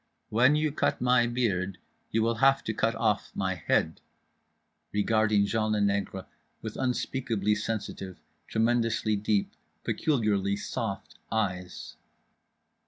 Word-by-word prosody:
"When 125 +6 +4
you 155 0 +1
cut 150 - 0
my 125 -1 +4
beard 100 -6 -1 0.3
you 110 0 +1
will 115 +1 +2
have 135 0 +5
to 110 - -2
cut 115 +2 0
off 105 -3 0
my 95 -1 0
head" 90 - 0 0.9
regarding 105 0 +2
Jean 110 +1 0
le 105 - +1
Nègre 100 -2 0 0.4
with 110 -1 -5
unspeakably 125 -4 0
sensitive, 105 -3 -4 0.3
tremendously 115 -1 +1
deep, 105 0 0 0.3
peculiarly 105 -9 +1
soft 100 - -5
eyes. 90 -5 -3
110 Hz, 115 wpm, -28 LUFS, 100-120 Hz, 0.9 s, have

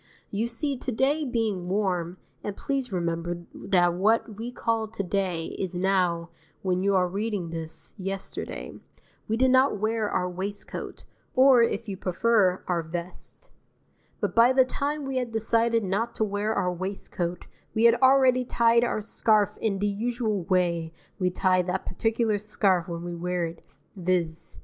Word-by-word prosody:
You 215 +3 0
see 255 +3 -2
to 255 - -3
day 280 +6 +1
being 220 -8 -1
warm 185 -3 -1 0.3
(and 205 -1 -4
please 270 -4 -2
remember 170 -1 -2
that 180 -3 +2
what 215 +4 +1
we 230 +4 -5
call 225 -2 -1
to 215 -2 -4
day, 180 -3 -2
is 190 -2 -3
now, 180 -2 +1 0.3
when 185 -1 +1
you 200 0 +2
are 180 -1 +3
reading 200 -2 -3
this, 165 -1 -6
yesterday) 195 +1 -5 0.5
we 225 - 0
did 260 +1 +4
not 260 -2 +4
wear 215 +1 0
our 180 -1 0
waistcoat, 195 +3 -5 0.3
or, 260 -1 +7
if 230 -1 0
you 195 -2 -4
prefer, 190 0 +2
our 175 -2 +1
vest; 175 - -7 0.7
but - - -1
by 230 +2 +6
the 260 0 +5
time 285 +3 -2
we 270 -1 -2
had 250 -2 -2
decided 230 +1 +1
not 205 +5 -1
to - - 0
wear 205 +1 -1
our 180 -4 0
waistcoat 180 -1 -4 0.3
we 220 - +2
had 235 0 +8
already 260 -1 +5
tied 235 -1 +3
our 225 -3 0
scarf 215 -1 +2
in 210 -3 0
the 200 - -1
usual 215 -2 -1
way 170 -3 +1 0.3
we 185 -1 +2
tie 185 0 +2
that 180 +1 -3
particular 225 +1 0
scarf 195 -4 +1
when 170 -1 -5
we 175 0 -5
wear 175 0 -1
it, 165 0 -8 0.3
viz. 170 - -1
200 Hz, 165 wpm, -26 LUFS, 180-230 Hz, 0.7 s, had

